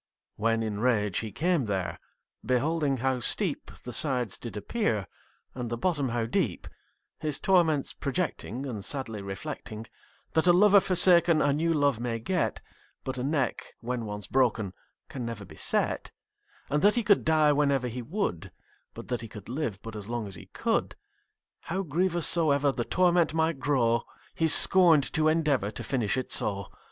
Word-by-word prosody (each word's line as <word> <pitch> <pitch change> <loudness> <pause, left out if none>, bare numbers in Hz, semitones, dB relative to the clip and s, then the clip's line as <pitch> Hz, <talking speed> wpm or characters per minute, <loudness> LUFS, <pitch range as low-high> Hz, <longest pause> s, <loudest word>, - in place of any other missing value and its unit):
When 115 +1 0
in 105 -2 -3
rage 105 -5 +1
he 110 -2 -5
came 165 - 0
there, 95 -6 -3 0.4
Beholding 140 +2 0
how 130 -1 +1
steep 120 - +2
The 125 - -6
sides 125 -5 0
did 115 -3 -7
appear, 110 - -1 0.5
And 125 -2 -5
the 120 - -3
bottom 145 -3 0
how 115 -1 -1
deep, 115 - -2 0.5
His 150 -2 -2
torments 165 -7 +2
projecting 140 - -3
And 110 -7 -5
sadly 115 -6 -3
reflecting, 110 +2 -7 0.5
That 160 +2 +2
a 175 - +7
lover 205 +2 +6
forsaken 175 -3 +6
A 145 -2 +2
new 165 +3 0
love 145 -6 +1
may 120 -1 -2
get; 175 +9 -2 0.4
But 130 -1 -4
a - - -2
neck, 140 -2 -2
when 120 -1 -4
once 105 -1 -5
broken, 115 -7 0 0.3
Can 130 - -6
never 115 -4 -6
be - - -14
set: - - -1 0.6
And 150 +1 +1
that 205 +2 +4
he 240 - +1
could 205 -2 +3
die 155 -2 +3
Whenever 140 -3 +1
he 125 +1 -5
would; 155 - -3 0.4
But - - -9
that 120 -3 -2
he 115 - -7
could 105 -1 -11
live 125 -7 -4
But 115 -1 -8
as 105 0 -7
long 120 -2 -3
as 100 - -6
he - - -8
could: - - -1 0.7
How 190 +3 -2
grievous 175 +1 0
soever 145 -4 +2
The 120 -3 -3
torment 175 -3 +2
might 160 -2 0
grow, 120 -5 +1 0.3
He 165 - +1
scorn'd 165 -2 +5
to 155 -1 +2
endeavour 150 -9 +1
To 105 - -7
finish 120 -5 -1
it 130 - -4
so. 100 -2 0
135 Hz, 170 wpm, -28 LUFS, 115-160 Hz, 0.7 s, a